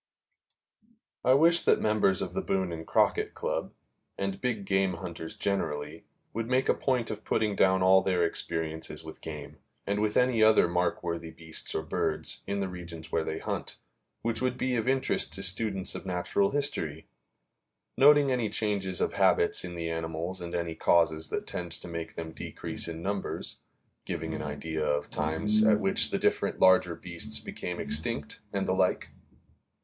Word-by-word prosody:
I 130 - +5
wish 170 +4 +5
that - - +3
members 105 -3 +2
of - - -6
the - - -1
Boone 95 -2 -1
and 80 -1 -7
Crockett - - +2
Club, - - -2 0.5
and 100 -1 -3
big 115 -6 -2
game 95 -1 +2
hunters 85 -2 -7
generally, 75 -5 -2 0.3
would 115 +1 -3
make 130 +1 +2
a - - +5
point 125 -4 0
of 110 0 -6
putting 105 -2 0
down 95 -1 +3
all 95 +1 +6
their 90 -3 +1
experiences 80 -1 -3
with 80 0 -10
game, 75 -3 -8 0.3
and 100 +1 0
with 105 -1 +1
any 125 -3 +3
other 110 -4 +6
markworthy 85 -1 -1
beasts 80 -1 -3
or 80 - -1
birds, 80 - -1
in 100 0 -1
the 95 - -1
regions 85 -3 -8
where 80 - +1
they 80 - -3
hunt, - - -4 0.5
which 115 +1 -1
would 130 0 0
be 130 -1 0
of 115 -1 -1
interest 130 - +1
to 95 +3 -4
students 95 0 -1
of - - -6
natural 90 - +1
history; 135 - -1 0.9
noting 145 0 +6
any 120 -4 0
changes 100 -4 -1
of - - 0
habits 85 - +3
in 90 -1 -6
the 85 -1 -3
animals 80 +3 -4
and 85 0 -5
any 85 -1 -2
causes 80 -1 +2
that - - -3
tend 85 -1 -5
to - - -7
make 85 -1 -6
them 80 -1 -5
decrease - - -4
in 85 0 -6
numbers, 100 +1 -3 0.5
giving - - -4
an - - -4
idea 80 +2 -3
of 75 -1 +1
the - - -3
times 80 +8 +4
at 110 -1 +5
which 95 -2 +3
the - - 0
different - - 0
larger 95 -2 +5
beasts 90 +6 -1
became 90 -1 -5
extinct, 75 -1 -1
and - - -1
the - - +2
like. - - +1
90 Hz, 175 wpm, -29 LUFS, 80-110 Hz, 0.9 s, all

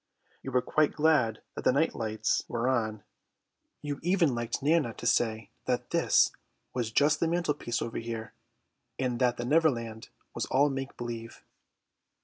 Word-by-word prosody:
You 135 - -6
were 125 0 +2
quite 155 -1 +2
glad 150 -8 +2
that - - -6
the - - +5
night - - +2
lights 110 -1 -1
were 120 +1 -1
on. 110 -5 0 0.8
You 145 -1 -3
even 175 -4 +2
liked 120 +2 -3
Nana 150 -6 +2
to - - -8
say 115 -2 +1
that - - -1
this - - +4 0.4
was 120 -3 -1
just 145 +5 +3
the 165 - +2
mantelpiece 150 -8 -1
over 115 - -4
here, 115 -1 -5 0.6
and 125 -2 -1
that 125 -1 +2
the 120 - -3
Neverland 120 -7 +1 0.2
was - - -3
all 140 +2 +3
make 135 0 -5
believe. 115 -1 -6
125 Hz, 155 wpm, -29 LUFS, 115-145 Hz, 0.8 s, the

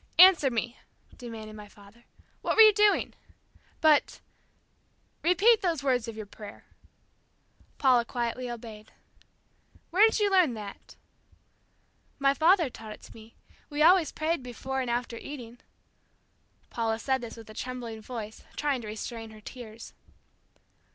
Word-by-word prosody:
"Answer 360 -5 +8
me," 240 0 -3 0.4
demanded 220 -3 -9
my 210 -1 -10
father. 205 +3 -19 0.4
"What - - -1
were 445 - +9
you 430 -1 +8
doing?" 420 0 +3 0.7
"But 310 -2 +3 0.5
..." - - -42
"Repeat 405 +7 +4
those 330 -6 -1
words 250 -4 +1
of 225 -1 -7
your 215 - -6
prayer." 205 +1 -12 1.1
Paula 255 -3 +4
quietly 240 +1 -3
obeyed. 220 -2 -9 1.0
"Where 370 +4 +2
did - - -2
you 415 -2 +1
learn 360 -10 +4
that?" 205 -2 -10 1.2
"My 275 0 +3
father 330 +3 +4
taught 220 -3 -9
it - - -16
to - - -13
me. 225 0 -15 0.3
We 295 0 +1
always 350 -1 +5
prayed 315 -1 -1
before 265 +2 -4
and 250 - -3
after 240 0 -2
eating." 245 -3 -9 1.1
Paula 225 -1 -1
said 265 +3 -1
this 235 -1 -8
with 225 - -12
a 215 - -11
trembling 235 -2 -6
voice, 220 -2 -8
trying 285 -4 -1
to 220 - -8
restrain 225 +1 -6
her 215 0 -13
tears. 225 -1 -10
245 Hz, 145 wpm, -28 LUFS, 225-300 Hz, 1.2 s, were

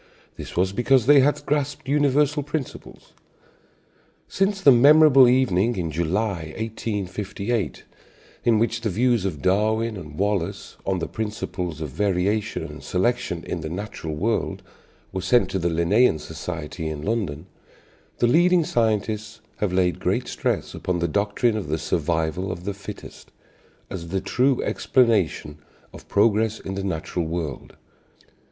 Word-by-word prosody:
This - - -9
was 95 +2 +1
because 120 +2 +3
they 145 +1 +7
had 145 +2 +2
grasped 145 -2 -2
universal 145 +1 +2
principles. 145 -1 -7 1.1
Since 195 +1 0
the 145 -8 +7
memorable 135 +1 +7
evening 120 -3 +2
in 85 -4 -3
July, 85 0 -2
1858, 105 -2 -3 0.6
in 115 -2 +4
which 115 +1 0
the 115 - -1
views 115 0 +1
of 80 -7 -4
Darwin 110 +3 +1
and 75 -4 -10
Wallace 100 -3 -2
on 95 -1 +1
the 85 -2 -3
principles 95 -6 -4
of 75 - -3
variation 100 +4 0
and - - -8
selection 90 -3 -1
in 85 - -4
the 80 - -5
natural 85 -4 -5
world 110 +8 -1 0.5
were 95 - -3
sent 120 +7 +2
to 95 - -1
the 85 0 0
Linnaean 85 +5 +3
Society 80 +1 -6
in 75 -1 -6
London, 95 -8 -2 0.7
the - - +2
leading 175 +7 +4
scientists 110 -3 -1 0.2
have 105 -3 -1
laid 90 -1 +1
great - - -1
stress - - -2
upon 90 -1 -2
the 85 0 0
doctrine 100 +5 +1
of 105 -6 -3
the 80 +2 -1
survival 80 +3 -1
of 85 - -7
the 100 +2 -3
"fittest" 100 0 -10 0.6
as 85 -3 -6
the 95 +3 -1
true 130 +6 +1
explanation 100 - +1 0.3
of - - -13
progress 110 +1 +2
in 95 - -6
the 95 0 -4
natural 85 -2 -3
world. 80 -5 -5
100 Hz, 145 wpm, -23 LUFS, 85-120 Hz, 1.1 s, they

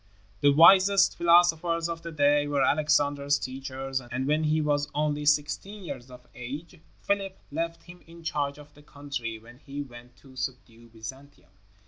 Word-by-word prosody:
The 145 - +4
wisest 190 +6 +6
philosophers 170 -1 +3
of 165 -1 -5
the 170 0 -7
day 145 -1 +3
were 145 -1 +1
Alexander's 145 -2 +2
teachers, 135 0 -5
and 125 +1 -4
when 155 +2 +1
he 155 +1 +2
was 145 -1 0
only 150 0 -1
sixteen 150 +8 0
years 130 -7 -7
of 125 -1 -14
age, 145 +8 -8 0.2
Philip 195 -1 -1
left 165 +2 -3
him 175 +1 -14
in 170 0 -14
charge 145 -3 -2
of 145 0 -15
the 145 - -17
country 140 -6 -6
when 120 +3 -16
he 145 0 -6
went 120 -2 -14
to 135 -2 -18
subdue 125 -3 -6
Byzantium. 115 -1 -11
145 Hz, 160 wpm, -27 LUFS, 130-165 Hz, 0.2 s, wisest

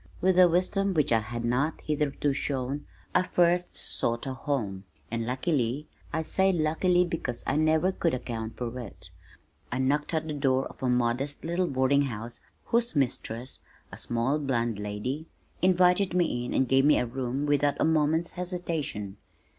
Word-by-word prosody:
With 185 0 +3
a 180 -1 +8
wisdom 185 +3 +1
which 150 -5 +2
I 115 - +5
had 115 +2 -5
not 130 +6 0
hitherto 145 -1 0
shown 135 0 -2 0.3
I 180 - +5
first 180 0 +1
sought 115 0 -1
a 135 - -3
home, 125 -9 -3 0.3
and 115 -1 -2
luckily, 130 +1 -1 0.2
I 160 - -1
say 190 +4 +2
luckily 175 +2 +2
because 130 -8 -3
I - - 0
never 155 +4 +3
could 165 -5 0
account 115 -3 -5
for 120 0 -4
it, 115 -5 -10 0.6
I 125 - -1
knocked 145 +5 0
at 160 0 -1
the 155 - -3
door 135 -2 +1
of - - -11
a 130 - +1
modest 125 +5 0
little 175 +2 0
boarding 135 0 +2
house, 115 -2 -6 0.3
whose 235 -4 +2
mistress, 125 -2 -2 0.3
a - - -9
small 120 +5 0
blonde 120 -6 -1
lady, 105 +10 -4 0.3
invited 180 0 +4
me 160 -9 +1
in - - -4
and 130 - +2
gave 135 +2 +4
me 150 +1 +5
a - - +1
room 130 +3 -3
without 145 0 +2
a - - +3
moment's 160 +1 +2
hesitation. 165 - -3
140 Hz, 170 wpm, -28 LUFS, 120-165 Hz, 0.6 s, a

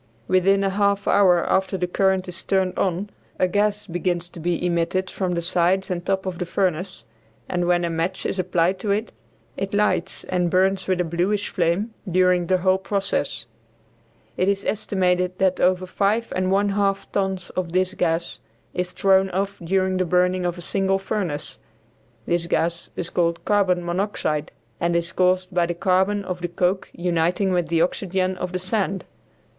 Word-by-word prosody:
Within 195 +2 +3
a 195 - +1
half 200 0 +1
hour 180 -4 +4
after 190 0 +1
the 180 - 0
current 190 +1 +1
is 180 +1 -7
turned 190 -1 +1
on 195 +2 -1 0.3
a 185 - +3
gas 205 +2 0
begins 175 -1 -2
to - - -10
be 175 +1 -1
emitted 175 +2 0
from 185 -2 -2
the 170 - -2
sides 185 +2 +1
and 175 -1 -2
top 190 +1 -1
of 185 -2 -4
the 180 - -1
furnace, 185 0 -1 0.4
and 175 -1 -1
when 175 -1 +2
a - - -1
match 165 +3 -2
is 190 - -2
applied 180 0 +1
to 205 - -4
it, 210 +3 0 0.5
it 195 +1 -3
lights 205 -3 0
and 180 -1 0
burns 190 +2 +2
with 185 -1 +1
a - - +2
bluish 180 +5 -1
flame 185 +5 0 0.2
during 180 -1 +3
the 185 - +3
whole 185 +1 +2
process. 190 - -2 0.9
It 185 +2 +2
is 200 0 -1
estimated 180 -3 0
that 190 -1 +2
over 185 0 +2
five 205 +5 0
and 185 0 0
one 200 +1 +2
half 195 -1 0
tons 190 -2 -1
of 180 -2 -3
this 185 +1 +1
gas 170 -2 -1 0.3
is 180 0 -3
thrown 190 0 +3
off 195 +2 -2
during 185 +2 +1
the 185 - +2
burning 180 +1 +2
of 175 0 -3
a - - -7
single 195 +2 +1
furnace. 190 -7 -4 0.7
This 170 0 0
gas 170 0 -1
is 175 - -3
called 170 -1 0
carbon 185 -4 +2
monoxide, 175 -4 -1 0.3
and 170 0 0
is 170 0 0
caused 185 0 +1
by 175 -1 +2
the 175 - -3
carbon 190 +3 +1
of 180 -1 -4
the 175 - -1
coke 180 +2 0
uniting 175 +2 0
with 175 -2 +1
the 165 -1 +2
oxygen 185 +1 -1
of 180 - -3
the 185 - -1
sand. 190 0 -2
185 Hz, 180 wpm, -23 LUFS, 175-195 Hz, 0.9 s, hour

